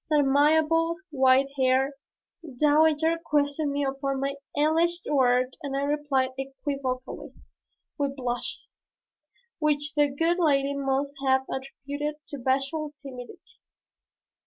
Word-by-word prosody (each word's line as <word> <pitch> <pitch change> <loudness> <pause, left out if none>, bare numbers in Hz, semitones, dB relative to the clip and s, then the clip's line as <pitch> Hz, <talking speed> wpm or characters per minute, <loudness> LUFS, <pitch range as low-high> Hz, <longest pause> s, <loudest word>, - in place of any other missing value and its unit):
This 305 - +3
amiable 315 +4 +3 0.2
white 265 -1 +4
haired 265 +1 +2 0.7
dowager 315 +2 +3
questioned 290 -1 0
me 285 0 -1
upon 275 0 -2
my 275 +1 -1 0.2
alleged 330 +3 +2
work 255 -3 +3
and 275 -3 -3
I 280 - 0
replied 285 -3 0
equivocally, 270 -1 -4 0.7
with 280 -1 -1
blushes, 245 -2 -5 0.8
which 300 -1 0
the 295 -1 +3
good 330 +5 0
lady 280 -4 +2
must 275 0 -1
have 265 0 +3
attributed 285 +3 -5
to 285 - -6
bashful 275 +4 -1
timidity. 255 -3 -11
280 Hz, 110 wpm, -26 LUFS, 270-300 Hz, 0.8 s, white